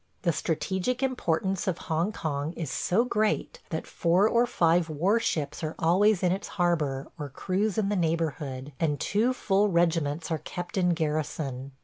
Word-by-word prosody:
The 170 Hz, -3 st, +2 dB
strategic 190 Hz, -, -1 dB
importance 195 Hz, -8 st, 0 dB
of 180 Hz, -3 st, 0 dB
Hong 165 Hz, +5 st, 0 dB
Kong 150 Hz, -4 st, -3 dB
is 165 Hz, -5 st, -4 dB
so 225 Hz, +7 st, +1 dB
great 215 Hz, -3 st, 0 dB
that 160 Hz, -, -3 dB
four 180 Hz, +5 st, +2 dB
or 235 Hz, +2 st, +3 dB
five 170 Hz, -4 st, +2 dB
war 180 Hz, +9 st, +2 dB
ships 150 Hz, -8 st, -2 dB
are 155 Hz, 0 st, -3 dB
always 185 Hz, +4 st, +3 dB
in 180 Hz, -, +3 dB
its 195 Hz, +2 st, -2 dB
harbor 155 Hz, -7 st, 0 dB
or 145 Hz, -1 st, -4 dB
cruise 195 Hz, +9 st, -1 dB
in 205 Hz, -2 st, +1 dB
the 205 Hz, -, +1 dB
neighborhood, 155 Hz, -5 st, -2 dB
and 150 Hz, -3 st, 0 dB
two 220 Hz, +5 st, +1 dB
full 205 Hz, -5 st, +2 dB
regiments 165 Hz, -3 st, +1 dB
are 160 Hz, -, 0 dB
kept 175 Hz, +3 st, -6 dB
in 180 Hz, -3 st, +2 dB
garrison. 150 Hz, -4 st, -2 dB
170 Hz, 165 wpm, -28 LUFS, 155-195 Hz, -, or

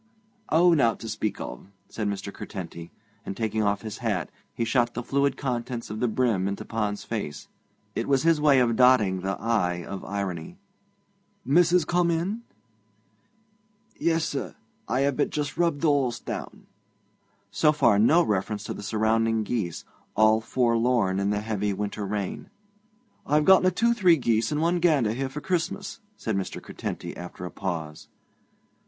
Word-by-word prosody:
'Oh, 170 Hz, +2 st, +5 dB
nowt 115 Hz, -8 st, +2 dB
to 115 Hz, -, -6 dB
speak 110 Hz, -1 st, -3 dB
of,' -, -, -7 dB, 0.2 s
said 105 Hz, -2 st, -3 dB
Mr. 100 Hz, 0 st, -4 dB
Curtenty, 85 Hz, -4 st, -7 dB, 0.3 s
and, 95 Hz, -, -6 dB
taking 110 Hz, -1 st, -1 dB
off 100 Hz, -2 st, 0 dB
his 110 Hz, -2 st, -6 dB
hat, 105 Hz, -8 st, -2 dB, 0.2 s
he 115 Hz, -, -2 dB
shot 120 Hz, +1 st, +1 dB
the 125 Hz, -, -3 dB
fluid 140 Hz, +2 st, +1 dB
contents 120 Hz, -3 st, -3 dB
of 110 Hz, -, -5 dB
the 125 Hz, -, +1 dB
brim 110 Hz, -5 st, +1 dB
into 100 Hz, 0 st, -4 dB
Pond's 105 Hz, -3 st, -2 dB
face. 100 Hz, -, -5 dB, 0.5 s
It -, -, -2 dB
was 135 Hz, -1 st, +2 dB
his 165 Hz, -2 st, +3 dB
way 145 Hz, -2 st, +5 dB
of 115 Hz, -2 st, +2 dB
dotting 110 Hz, -7 st, +4 dB
the 95 Hz, 0 st, -3 dB
'i' 90 Hz, -6 st, 0 dB
of 100 Hz, -1 st, -6 dB
irony. 95 Hz, -5 st, -4 dB, 0.9 s
'Missis 170 Hz, +4 st, +4 dB
come 175 Hz, +1 st, +2 dB
in?' 175 Hz, +7 st, -1 dB, 1.5 s
'Yes, 165 Hz, -1 st, +1 dB
sir; 140 Hz, -, -4 dB, 0.3 s
I 130 Hz, -, 0 dB
have 140 Hz, -1 st, +1 dB
but 145 Hz, -, +1 dB
just 145 Hz, -1 st, -3 dB
rubbed 170 Hz, -4 st, +1 dB
the 165 Hz, -, +3 dB
horse 130 Hz, -5 st, +1 dB
down.' -, -, -7 dB, 0.9 s
So 125 Hz, +10 st, +4 dB
far 115 Hz, -9 st, +3 dB
no 155 Hz, +11 st, +5 dB
reference 105 Hz, -, -1 dB
to -, -, -4 dB
the -, -, -8 dB
surrounding 110 Hz, +1 st, +1 dB
geese, 105 Hz, -7 st, -3 dB, 0.3 s
all 110 Hz, +1 st, +4 dB
forlorn 115 Hz, -4 st, +1 dB
in 100 Hz, 0 st, 0 dB
the 105 Hz, 0 st, 0 dB
heavy 105 Hz, -2 st, -1 dB
winter 105 Hz, +1 st, -3 dB
rain. 100 Hz, -2 st, -4 dB, 0.8 s
'I've 150 Hz, +1 st, +3 dB
gotten 190 Hz, -1 st, +6 dB
a -, -, +4 dB
two 235 Hz, +6 st, +2 dB
three 185 Hz, -7 st, +4 dB
geese 115 Hz, -4 st, +1 dB
and 150 Hz, 0 st, 0 dB
one 175 Hz, +1 st, +2 dB
gander 150 Hz, -11 st, +3 dB
here 135 Hz, +2 st, -2 dB
for 150 Hz, +3 st, -6 dB
Christmas,' 190 Hz, +4 st, -2 dB, 0.2 s
said 110 Hz, -, -2 dB
Mr. 95 Hz, -1 st, -3 dB
Curtenty -, -, -6 dB
after 90 Hz, 0 st, -8 dB
a 90 Hz, -, -6 dB
pause. 80 Hz, -5 st, -5 dB
115 Hz, 165 wpm, -26 LUFS, 100-150 Hz, 1.5 s, gotten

